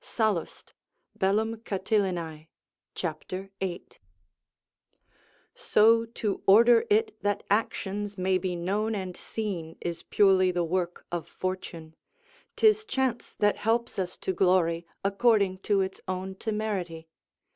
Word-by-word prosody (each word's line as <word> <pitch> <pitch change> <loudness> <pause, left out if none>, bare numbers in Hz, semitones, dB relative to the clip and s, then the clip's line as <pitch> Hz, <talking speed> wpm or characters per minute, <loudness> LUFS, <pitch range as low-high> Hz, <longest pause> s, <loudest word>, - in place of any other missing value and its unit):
Sallust, 215 -7 -2 0.5
Catilina, 195 -5 -1 0.5
c. 175 - -1 0.5
8.] 180 -2 -5 1.5
So 230 +2 +4
to 225 -3 -3
order 230 +3 +7
it 430 0 +2
that 205 0 -1
actions 205 -1 -1
may 185 0 +1
be 185 -2 -2
known 205 +6 -1
and 185 -3 -4
seen 180 -7 -5
is 170 -1 -4
purely 190 -2 +4
the 175 -1 0
work 175 +1 -2
of 175 -2 -3
fortune; 175 -4 -5 0.6
'tis 430 -1 +4
chance 265 - -2
that 205 -1 +2
helps 230 0 0
us 180 -1 -3
to 190 - -2
glory, 175 -2 +2 0.2
according 200 -2 +2
to 200 0 +1
its 190 0 -4
own 185 +1 -3
temerity. 190 -6 -3
195 Hz, 115 wpm, -28 LUFS, 180-220 Hz, 1.5 s, order